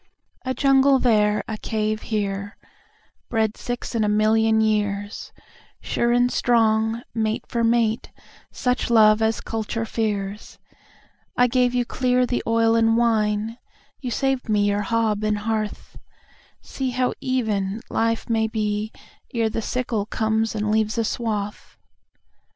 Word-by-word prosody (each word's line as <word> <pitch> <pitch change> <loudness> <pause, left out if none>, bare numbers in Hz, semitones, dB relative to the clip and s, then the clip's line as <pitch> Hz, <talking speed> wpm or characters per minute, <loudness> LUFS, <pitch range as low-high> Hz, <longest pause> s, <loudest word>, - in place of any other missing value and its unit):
A 260 0 -1
jungle 275 +1 +4
there, 210 -4 +2
a 220 -1 -5
cave 215 -1 -2
here, 200 -2 -3 0.7
bred 220 -2 +1
sixAnd 240 -2 -3
a 210 - +1
million 220 +1 +3
years, 205 -2 -1 0.5
Sure 235 0 0
and 245 +1 +3
strong, 225 -1 +2
mate 220 -1 -1
for 235 -1 -1
mate, 230 -1 +1 0.4
suchLove 225 -4 +3
as 220 0 +1
culture 225 0 -3
fears;I 210 +3 -4
gave 250 0 +2
you 245 -1 +1
clear 250 0 +1
the 245 0 -1
oil 225 0 +3
and 225 0 +3
wine; 220 -1 +1 0.4
You 255 - -4
saved 265 0 -1
me 205 -1 +2
your 205 0 +1
hob 215 0 0
and 215 0 +1
hearth—See 220 +4 -6
how 250 0 0
even 215 -6 -1
life 230 0 0
may 225 -1 +1
be 215 -1 -2 0.4
ere 225 -1 +1
theSickle 225 -2 -2
comes 220 0 0
and 210 0 -1
leaves 220 +1 +1
a 230 - +2
swath. 210 -3 -4
225 Hz, 125 wpm, -23 LUFS, 215-235 Hz, 0.7 s, jungle